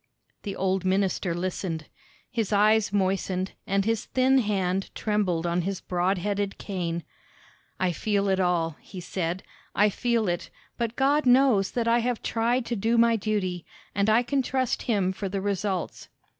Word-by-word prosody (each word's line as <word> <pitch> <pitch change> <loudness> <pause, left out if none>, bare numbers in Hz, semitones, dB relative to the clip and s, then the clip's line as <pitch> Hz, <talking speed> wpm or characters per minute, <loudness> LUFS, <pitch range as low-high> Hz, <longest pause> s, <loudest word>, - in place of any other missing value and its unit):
The 200 -2 -5
old 190 0 0
minister 190 -2 +1
listened. 175 -3 -3 0.5
His 225 -4 -1
eyes 215 +1 +4
moistened, 190 -1 0 0.2
and 195 0 +1
his 225 0 0
thin 265 +1 +3
hand 195 -4 0
trembled 195 -6 0
on 170 +1 +1
his 190 +1 -3
broad 180 +2 0
headed 200 +1 -2
cane. 170 -4 -3 0.8
"I 185 -1 +2
feel 200 +3 0
it 190 -1 +2
all," 170 -4 +1
he 190 - -9
said; 180 0 -3 0.3
"I 210 +1 +5
feel 235 0 0
it, 175 -1 -2 0.3
but 235 -1 -2
God 280 +1 +2
knows 245 -6 +5
that 235 -1 0
I 235 +1 +4
have 240 0 -1
tried 235 +2 +1
to 235 - -2
do 225 +3 +1
my 230 0 +5
duty, 195 -5 -1 0.3
and 200 +2 +1
I 225 +3 +4
can 275 +2 +1
trust 260 -1 -1
him 195 -5 +2
for 195 +1 -4
the 195 +1 -2
results." 195 -2 -2
200 Hz, 165 wpm, -26 LUFS, 185-225 Hz, 0.8 s, I